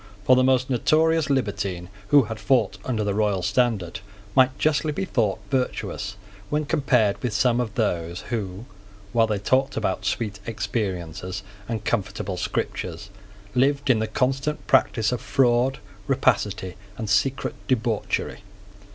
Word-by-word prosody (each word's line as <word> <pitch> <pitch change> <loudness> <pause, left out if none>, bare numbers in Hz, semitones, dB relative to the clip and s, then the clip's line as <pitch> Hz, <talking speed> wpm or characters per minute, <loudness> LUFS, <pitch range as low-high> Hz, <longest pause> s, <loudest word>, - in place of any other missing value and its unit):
For 130 - +7
the 130 - +4
most 130 -1 +3
notorious 155 +5 +2
libertine 100 -9 -1 0.2
who 145 +3 +6
had 110 -1 -6
fought 110 -2 +2
under 115 -4 -1
the 100 -1 0
royal 100 -3 +1
standard 105 -4 0 0.4
might 130 0 +4
justly 155 0 +1
be 175 +6 -2
thought 110 - +1
virtuous 130 -2 -2 0.3
when 150 0 0
compared 125 -9 +2
with 125 -4 -2
some 125 0 +3
of 110 -4 -2
those 85 -6 -1
who, 105 -3 -4 0.5
while 115 -1 +4
they 105 -2 0
talked 130 +7 +1
about 95 0 -1
sweet 105 -2 -2
experiences 95 -4 -3 0.3
and 110 -3 -3
comfortable 100 -3 -2
scriptures, 90 +1 -3 0.4
lived 140 +2 +3
in 115 - +3
the 110 - -1
constant 135 +6 -1
practice 110 -2 +3
of 125 -2 -2
fraud, 130 -1 +2 0.3
rapacity, 105 -8 +1 0.2
and 110 - -4
secret 105 +8 +1
debauchery. 115 -4 -1
115 Hz, 140 wpm, -24 LUFS, 100-130 Hz, 0.5 s, For